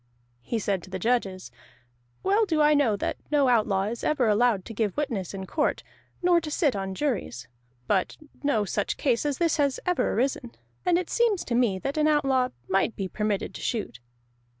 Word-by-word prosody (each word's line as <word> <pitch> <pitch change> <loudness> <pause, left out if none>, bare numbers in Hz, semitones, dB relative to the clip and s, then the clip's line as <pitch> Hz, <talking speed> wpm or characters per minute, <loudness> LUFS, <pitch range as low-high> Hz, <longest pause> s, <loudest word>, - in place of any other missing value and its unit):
He 230 - -3
said 200 -3 -1
to 185 - -13
the 190 - -4
judges: 195 -3 -1 0.7
"Well 410 +3 +3
do 320 -4 +1
I 300 0 +5
know 280 -8 +3
that - - -3
no 290 -3 +3
outlaw 215 -5 +2
is 225 +3 -4
ever 270 -6 +2
allowed 215 -2 +2
to 225 - -8
give 210 -3 -1
witness 235 - -2
in 190 -1 -6
court, 300 - -1 0.4
nor 350 -1 +4
to 310 - -5
sit 295 - +1
on 195 -1 -3
juries. 185 - -2 0.4
But 190 +3 0 0.2
no 255 -8 +1
such 205 +1 -2
case 255 +1 +1
as 285 - -1
this 335 -2 +1
has 280 -3 +1
ever 360 0 +1
arisen, 250 0 -1 0.3
and 350 -1 +4
it 360 -1 -3
seems 460 -6 +2
to 240 - -3
me 235 -5 +2
that 275 +10 -4
an 305 0 +3
outlaw 270 -4 +2 0.2
might 195 +4 +1
be 195 - -3
permitted 210 +1 -2
to - - -8
shoot." 215 - -3
240 Hz, 195 wpm, -26 LUFS, 200-295 Hz, 0.7 s, I